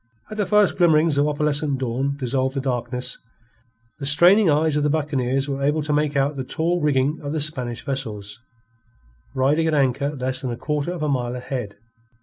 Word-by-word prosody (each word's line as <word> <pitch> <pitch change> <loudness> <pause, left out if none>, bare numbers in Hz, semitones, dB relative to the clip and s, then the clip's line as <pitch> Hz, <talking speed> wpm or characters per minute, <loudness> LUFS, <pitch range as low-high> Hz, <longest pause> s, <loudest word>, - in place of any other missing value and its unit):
As 215 - -6
the 205 - 0
first 210 -2 +3
glimmerings 160 -3 +4
of 145 - +3
opalescent 150 -1 0
dawn 135 +2 -2
dissolved 130 0 -1
the - - 0
darkness, 125 -1 -3 0.8
the 140 - -4
straining 175 +7 +6
eyes 155 +1 +2
of 150 - +1
the 150 - +1
buccaneers 135 -3 0
were 140 -1 -3
able 150 +2 +1
to 150 0 -1
make 150 0 0
out 140 +2 +1
the 135 - -3
tall 170 +6 -1
rigging 145 0 +1
of 145 0 -4
the 160 - -1
Spanish 130 -6 -3
vessels, 110 -6 -4 0.9
riding 145 +5 +2
at 160 - +1
anchor 140 0 +1
less 130 0 -2
than 130 - -3
a 120 - -4
quarter 150 +3 -2
of 175 -3 -4
a - - 0
mile 125 -3 -1
ahead. 125 -4 -5
140 Hz, 190 wpm, -22 LUFS, 130-150 Hz, 0.9 s, straining